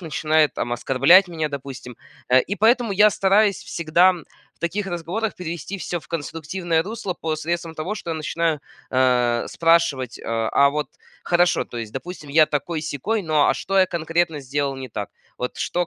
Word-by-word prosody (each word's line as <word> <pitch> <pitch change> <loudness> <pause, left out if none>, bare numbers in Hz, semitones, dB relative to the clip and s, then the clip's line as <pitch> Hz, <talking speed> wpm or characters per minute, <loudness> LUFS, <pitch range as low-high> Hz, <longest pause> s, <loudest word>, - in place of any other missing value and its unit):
начинает, 155 -3 +1
там 120 - -3
оскорблять 135 +10 +5
меня, 160 -3 -3
допустим. 135 -4 -8 0.3
Э, 130 +1 +6
и 195 - -3
поэтому 230 +1 +3
я 210 +2 +6
стараюсь 200 0 +3
всегда 170 +3 +2
в 175 -3 -15
таких 195 +4 -2
разговорах 185 +5 -3
перевести 180 +3 -6
всё 175 +1 -4
в - - -19
конструктивное 165 +1 -2
русло 200 -1 -5
посредством 165 +1 -3
того, 165 +7 -3
что 170 - -6
я - - -1
начинаю, 160 0 -1 0.3
э, 125 -2 +2
спрашивать: 165 -7 +1
"Э, - - -14 0.3
а 140 0 +5
вот 145 -1 -2 0.4
хорошо, 175 0 +2
то 120 - -8
есть, 110 -2 -6
допустим, 155 +2 -7
я 155 +2 +5
такой-сякой, 155 - -2
но 155 -4 +2
а - - +3
что 195 +1 -1
я 190 - +5
конкретно 165 -2 -1
сделал 140 +1 -2
не 130 -2 -8
так? 105 -1 -5 0.3
Вот 125 - -4
что 175 0 -1
165 Hz, 170 wpm, -22 LUFS, 140-180 Hz, 0.4 s, Э